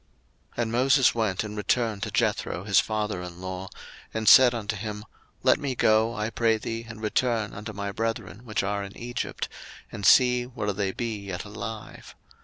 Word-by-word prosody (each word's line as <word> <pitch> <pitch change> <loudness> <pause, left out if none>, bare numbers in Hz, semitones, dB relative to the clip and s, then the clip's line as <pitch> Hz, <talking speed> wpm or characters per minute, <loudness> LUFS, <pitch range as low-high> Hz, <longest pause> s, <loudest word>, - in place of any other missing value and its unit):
02:004:018 - - -1
And 110 - -3
Moses 130 +2 +4
went 110 -5 0
and 105 -1 -6
returned 110 0 0
to - - -2
Jethro 90 - 0
his 100 -1 +4
father 105 -4 -1
in 90 -1 -8
law, 95 0 -6 0.4
and 110 -1 -3
said 125 -2 +8
unto 110 -1 -3
him, 105 0 -6 0.4
Let - - +4
me 140 -3 -2
go, 110 +1 +3
I 105 +2 -2
pray 115 -1 +2
thee, 115 +1 -5
and 110 -1 -9
return 110 -1 0
unto 105 +2 -6
my 100 -1 -4
brethren 115 0 -3
which 110 -5 -2
are 100 +1 -1
in 100 0 -9
Egypt, 120 +1 -4 0.4
and 100 - -7
see 125 +4 +5
whether 105 -5 -3
they 95 -1 -1
be 115 0 -3
yet 95 -1 -6
alive. 105 +1 -8
110 Hz, 185 wpm, -26 LUFS, 100-115 Hz, 0.4 s, said